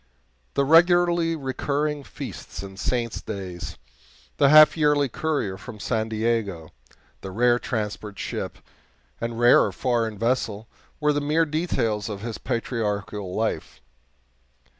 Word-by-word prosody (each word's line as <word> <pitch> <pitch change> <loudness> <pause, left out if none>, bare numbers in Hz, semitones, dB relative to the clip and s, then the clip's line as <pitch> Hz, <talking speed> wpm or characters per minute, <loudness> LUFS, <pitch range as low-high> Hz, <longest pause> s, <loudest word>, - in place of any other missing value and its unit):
The 140 - +2
regularly 170 +1 +4
recurring 145 +1 -2
feasts - - -8
and 95 0 -10
saints' 115 +1 -1
days, 95 -4 -6 0.6
the 140 - +5
half 155 0 +8
yearly 150 -3 +3
courier 120 -10 -2
from 115 -4 -10
San 110 0 -1
Diego, 110 -7 -1 0.5
the 95 - -6
rare 120 +5 +3
transport 105 -3 -4
ship - - -4 0.6
and 115 0 -3
rarer 120 0 +6
foreign 115 -4 -1
vessel, 115 -2 -1 0.3
were 150 -1 +2
the 145 - 0
mere 155 +3 +2
details 130 - -1
of 100 -2 -5
his 115 0 -5
patriarchal 105 -5 -3
life. 110 0 -2
120 Hz, 120 wpm, -24 LUFS, 105-145 Hz, 0.6 s, half